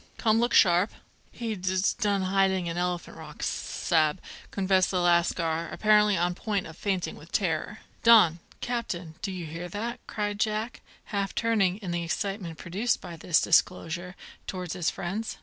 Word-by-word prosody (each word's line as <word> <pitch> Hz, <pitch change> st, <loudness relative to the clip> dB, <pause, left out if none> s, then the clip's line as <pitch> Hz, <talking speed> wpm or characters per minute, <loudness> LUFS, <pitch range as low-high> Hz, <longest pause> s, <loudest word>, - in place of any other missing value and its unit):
Come, 225 Hz, -1 st, +3 dB
look 240 Hz, +1 st, +1 dB
sharp!" 180 Hz, +2 st, +5 dB, 0.4 s
"He 230 Hz, -2 st, -4 dB
d 185 Hz, -1 st, -2 dB
d 185 Hz, -, +2 dB, 0.2 s
done 200 Hz, -4 st, +1 dB
hiding 190 Hz, -1 st, +2 dB
in 170 Hz, 0 st, -3 dB
Elephant 175 Hz, 0 st, -2 dB
Rock, -, -, -10 dB
s -, -, 0 dB
s -, -, -4 dB
sa'b," 160 Hz, 0 st, +3 dB, 0.3 s
confessed 190 Hz, -1 st, +2 dB
the 185 Hz, -, 0 dB
lascar, 170 Hz, -1 st, +1 dB
apparently 210 Hz, -2 st, +4 dB
on 175 Hz, +1 st, +1 dB
the -, -, -18 dB
point 205 Hz, -4 st, -1 dB
of 160 Hz, -, -10 dB
fainting 190 Hz, -1 st, -2 dB
with 165 Hz, -, -14 dB
terror. 190 Hz, +2 st, -1 dB, 0.2 s
"Don! 210 Hz, -8 st, +6 dB, 0.2 s
Captain! 185 Hz, -9 st, -3 dB
Do 195 Hz, -, -3 dB
you 180 Hz, -3 st, -5 dB
hear 165 Hz, +3 st, -6 dB
that?" 230 Hz, +6 st, -4 dB
cried 205 Hz, -1 st, -3 dB
Jack, 215 Hz, +2 st, -1 dB, 0.3 s
half 200 Hz, -1 st, -1 dB
turning, 210 Hz, -5 st, +2 dB
in 180 Hz, -, -3 dB
the 175 Hz, 0 st, -1 dB
excitement 185 Hz, -1 st, -3 dB
produced 200 Hz, +8 st, -1 dB
by 170 Hz, -, -8 dB
this 165 Hz, 0 st, +2 dB
disclosure, 175 Hz, +1 st, +1 dB, 0.3 s
towards 180 Hz, -3 st, -4 dB
his 180 Hz, -3 st, 0 dB
friends. 205 Hz, +6 st, -4 dB
185 Hz, 175 wpm, -27 LUFS, 175-210 Hz, 0.4 s, Don